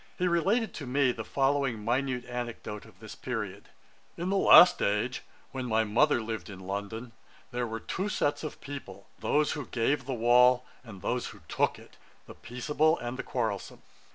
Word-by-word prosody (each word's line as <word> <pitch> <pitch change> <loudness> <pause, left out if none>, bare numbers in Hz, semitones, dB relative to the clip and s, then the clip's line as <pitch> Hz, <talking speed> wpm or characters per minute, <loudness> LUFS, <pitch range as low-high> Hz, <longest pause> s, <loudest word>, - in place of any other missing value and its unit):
He 180 - +1
related 195 +6 +1
to 145 - -7
me 130 0 +2
the 115 -2 -6
following 135 -4 0
minute 125 +1 0
anecdote 120 -4 -6
of - - -18
this - - -9
period: - - -5 0.5
'In 175 +3 -2
the - - +1
last 180 -2 +8
age, 105 +5 0 0.3
when 130 -1 -4
my 110 -1 +2
mother 120 +4 +2
lived 110 -1 -5
in 95 -2 -9
London, 100 +5 -5 0.4
there 120 0 -2
were 115 0 -4
two 190 - -3
sets 155 -8 0
of 155 - -6
people, 120 -9 -8
those 150 0 +1
who 145 -5 -5
gave 130 +5 0
the 135 - -1
wall, 125 +2 +5 0.2
and 100 -7 -12
those - - -1
who - - -11
took - - 0
it; - - -17 0.3
the - - -11
peaceable 150 +6 0
and 120 +1 -5
the - - -4
quarrelsome. 110 -6 -3
125 Hz, 180 wpm, -29 LUFS, 110-145 Hz, 0.5 s, last